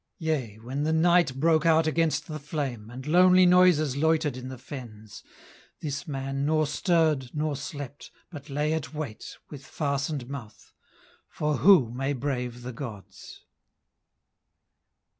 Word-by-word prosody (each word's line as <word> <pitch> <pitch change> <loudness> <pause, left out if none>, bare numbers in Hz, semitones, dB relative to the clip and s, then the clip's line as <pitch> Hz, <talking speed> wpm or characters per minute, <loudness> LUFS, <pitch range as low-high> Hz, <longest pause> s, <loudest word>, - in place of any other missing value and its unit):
Yea, 150 - -2
when 125 +6 -5
the 155 +2 0
night 170 -3 +3
broke 160 0 +3
out 165 -1 +4
against 155 -1 +1
the 155 -1 -6
flame, 135 -7 -4
And 125 +2 -9
lonely 180 +3 +6
noises 175 -6 +4
loitered 155 -1 +1
in 130 0 -7
the 130 - -7
fens, 115 -5 -10 0.6
This 145 +2 -5
man 135 -1 -3
nor 155 +1 +2
stirred 155 -3 +1
nor 150 -1 -1
slept, 140 0 -8 0.2
but 145 -3 -10
lay 150 +2 0
at 160 -1 -4
wait, 145 -8 -6
With 140 -2 -9
fastened 140 -2 -3
mouth. 125 -6 -10 0.6
For 150 -1 -1
who 155 - +5
may 135 +3 -2
brave 125 -3 -3
the 125 0 -6
gods? 105 -7 -9
145 Hz, 140 wpm, -27 LUFS, 130-160 Hz, 0.6 s, lonely